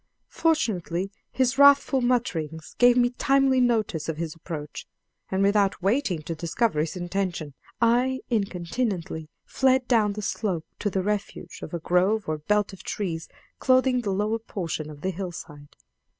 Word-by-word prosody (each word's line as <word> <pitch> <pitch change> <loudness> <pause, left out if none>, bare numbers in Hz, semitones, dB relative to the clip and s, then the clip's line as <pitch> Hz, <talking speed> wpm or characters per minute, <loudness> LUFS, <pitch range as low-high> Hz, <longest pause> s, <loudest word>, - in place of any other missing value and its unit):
Fortunately 195 - 0 0.2
his 260 +1 +1
wrathful 280 -1 +6
mutterings 165 - -1
gave 245 0 +6
me 245 0 +3
timely 270 0 +3
notice 220 -10 +1
of 160 - -3
his 160 -1 -3
approach, 155 -3 -7 0.4
and 190 +1 +1
without 200 -2 +2
waiting 195 - +1
to 165 - -4
discover 170 +3 0
his 155 +3 -1
intentions, 175 -4 -3 0.3
I 245 +3 +2
incontinently 185 -5 -2 0.2
fled 260 -1 +2
down 215 -4 +3
the 210 +1 -6
slope 190 -5 -2
to 205 - 0
the 190 -1 -1
refuge 205 0 -3
of - - -7
a 170 - -3
grove 185 +5 +1
or 155 -1 -2
belt 210 +5 0
of 195 - -11
trees 170 -6 -4 0.3
clothing 255 -1 +3
the 210 - -3
lower 210 +4 0
portion 170 -8 -4
of 145 -1 -11
the 190 - -1
hillside. 165 -5 -8
200 Hz, 150 wpm, -26 LUFS, 170-245 Hz, 0.4 s, wrathful